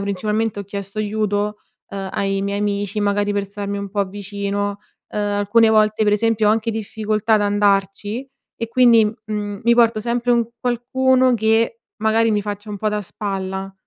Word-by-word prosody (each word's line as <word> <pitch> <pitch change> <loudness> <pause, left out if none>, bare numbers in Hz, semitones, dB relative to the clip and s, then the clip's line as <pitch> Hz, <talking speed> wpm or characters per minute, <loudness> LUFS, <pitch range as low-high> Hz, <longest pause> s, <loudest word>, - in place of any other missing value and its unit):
principalmente 210 +2 -1
ho - - -7
chiesto 200 +1 -7
aiuto, 210 0 -1 0.3
uhm, 195 -1 -5
ai 195 0 -1
miei 200 0 -2
amici, 205 0 -1
magari 205 0 +1
per 200 -1 -1
starmi 200 0 -4
un 200 -1 -6
po' 200 -1 0
vicino. 200 +1 -3 0.3
Uhm, 210 - -3
alcune 205 +2 +3
volte 215 0 +3
per 210 -1 +3
esempio 220 0 +2
ho - - +6
anche 225 +1 +1
difficoltà 220 0 -1
ad 210 - +3
andarci 205 +4 0 0.3
e 230 - -4
quindi, 235 -2 +5
mhmm, 210 -1 -4
mi 235 +1 +4
porto 230 -2 +4
sempre 240 +2 0
un 235 -1 +2
qualcuno 255 +1 +2
che 225 +1 +1 0.2
magari, 225 +1 +3
mi 205 -1 +1
faccia 205 +1 -6
un 205 - -4
po' 215 +2 -1
da 210 0 -1
spalla. 195 -1 -4
210 Hz, 175 wpm, -20 LUFS, 200-225 Hz, 0.3 s, ho